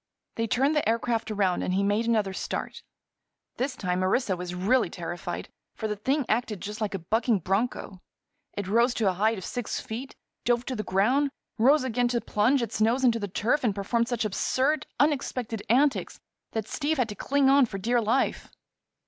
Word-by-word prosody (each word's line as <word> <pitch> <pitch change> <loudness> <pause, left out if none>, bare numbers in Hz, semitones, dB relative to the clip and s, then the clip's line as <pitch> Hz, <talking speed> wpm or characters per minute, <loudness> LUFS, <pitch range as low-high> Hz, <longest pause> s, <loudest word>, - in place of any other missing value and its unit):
They 230 0 -1
turned 275 +7 +2
the 295 -7 +2
aircraft 230 0 0
around 195 -4 +1
and 185 - -1
he 195 - +2
made 205 +3 +1
another 215 -4 +1
start. - - -4 0.8
This 255 +1 -1
time 180 -4 -1
Orissa 190 +1 +1
was 180 0 -5
really 205 +4 +2
terrified, 175 0 -5 0.3
for 220 - -3
the 210 - -2
thing 265 +7 0
acted 220 -3 0
just 210 +4 -6
like 205 -2 -1
a 175 -3 -7
bucking 225 -3 +2
broncho. 195 0 -2 0.6
It 200 -2 -3
rose 235 +5 +3
to 220 - +1
a - - 0
height 215 +4 +1
of 190 - -7
six 245 -3 -3
feet, 245 +5 -7 0.3
dove 240 0 +1
to 260 - -3
the 215 - -2
ground, 245 +10 +2 0.3
rose 275 +5 +5
again 245 -1 +1
to 240 0 0
plunge 235 +5 +2
its 220 -1 -4
nose 235 +5 +3
into 235 -2 +4
the 205 - -3
turf 235 +9 0
and 215 -5 +1
performed 230 +4 0
such 240 -3 -1
absurd, 260 +8 0
unexpected 255 -6 0
antics 275 +5 +2 0.3
that 220 -1 -2
Steve 305 +1 -1
had 250 -4 +1
to - - -4
cling 280 +3 +1
on 275 -1 +5
for 200 - -5
dear 235 +5 +1
life. 230 +5 0
230 Hz, 190 wpm, -27 LUFS, 205-255 Hz, 0.8 s, rose